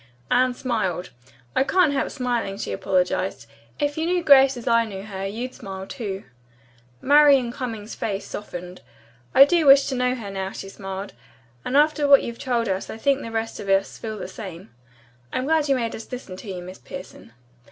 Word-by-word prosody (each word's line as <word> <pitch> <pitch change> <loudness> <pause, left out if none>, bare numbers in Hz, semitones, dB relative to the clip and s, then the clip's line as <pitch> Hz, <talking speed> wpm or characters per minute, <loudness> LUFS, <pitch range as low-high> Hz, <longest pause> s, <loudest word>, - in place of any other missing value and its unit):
Anne 250 0 +3
smiled. 190 - -2 0.4
"I - - +4
can't 335 0 +3
help 275 - 0
smiling," 240 -7 -2
she - - -4
apologized. 185 -6 0 0.3
"If 290 +1 -1
you 325 - 0
knew 355 0 +1
Grace 270 -3 +6
as 240 - -9
I 230 0 +4
know 195 -4 -7
her, 195 -2 -5
you'd 235 +6 -5
smile, 190 -1 -7
too." 200 -4 -5 0.8
Marian 280 -4 +5
Cummings's 225 -4 -5
face 200 -3 -3
softened. 180 -3 -8 0.5
"I 275 - +10
do 330 -1 +2
wish 275 0 +8
to 265 - -2
know 250 0 +1
her, 210 -5 -7
now," 190 0 -4
she 195 - -7
smiled. 195 0 -7 0.5
"After 295 +2 +3
what 280 -1 +7
you've 235 0 -6
told 240 -4 0
us 190 0 -2
I - - -6
think 275 +4 +1
the 230 - -6
rest 225 0 -3
of 200 - -6
us 195 0 +1
feel 220 -1 -5
the - - -6
same. 190 -3 -9 0.6
I'm 255 - -2
glad 310 -1 +2
you 275 - +4
made 230 -3 -2
us 225 - -10
listen 245 -7 -7
to 200 0 -7
you, 180 -1 -6
Miss 185 +1 -10
Pierson." 180 -10 -10
230 Hz, 190 wpm, -23 LUFS, 195-270 Hz, 0.8 s, I